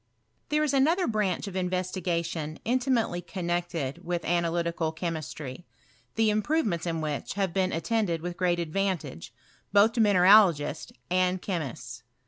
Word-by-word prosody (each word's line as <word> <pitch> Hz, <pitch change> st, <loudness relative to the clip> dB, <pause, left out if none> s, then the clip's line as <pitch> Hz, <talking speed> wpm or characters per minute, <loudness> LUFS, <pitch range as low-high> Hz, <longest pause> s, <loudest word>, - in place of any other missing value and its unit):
Thet« 300 Hz, +1 st, +2 dB
is 295 Hz, -2 st, 0 dB
another 320 Hz, +7 st, +3 dB
branch 210 Hz, -5 st, 0 dB
of 195 Hz, -, -7 dB
investigation 180 Hz, -4 st, -2 dB
intimately 245 Hz, -7 st, +1 dB
connected 175 Hz, -5 st, -3 dB
with 175 Hz, 0 st, -3 dB
analytical 170 Hz, -1 st, 0 dB
chemistry, 160 Hz, -3 st, -5 dB, 0.5 s
the 220 Hz, -1 st, +3 dB
improve 240 Hz, +10 st, +1 dB
ments 170 Hz, -5 st, -2 dB
in 165 Hz, -1 st, -2 dB
which 150 Hz, +1 st, -3 dB
have 195 Hz, -4 st, -1 dB
been 190 Hz, -1 st, +1 dB
attended 170 Hz, +1 st, 0 dB
with 175 Hz, 0 st, -4 dB
great 175 Hz, -2 st, +1 dB
ad 165 Hz, -2 st, -4 dB
vantage, 190 Hz, -, -2 dB, 0.4 s
both 205 Hz, +3 st, +5 dB
to 235 Hz, -, +1 dB
mineralogists 185 Hz, -6 st, +5 dB, 0.2 s
and 185 Hz, 0 st, +2 dB
chemists. 125 Hz, -, -5 dB
180 Hz, 135 wpm, -27 LUFS, 165-205 Hz, 0.5 s, both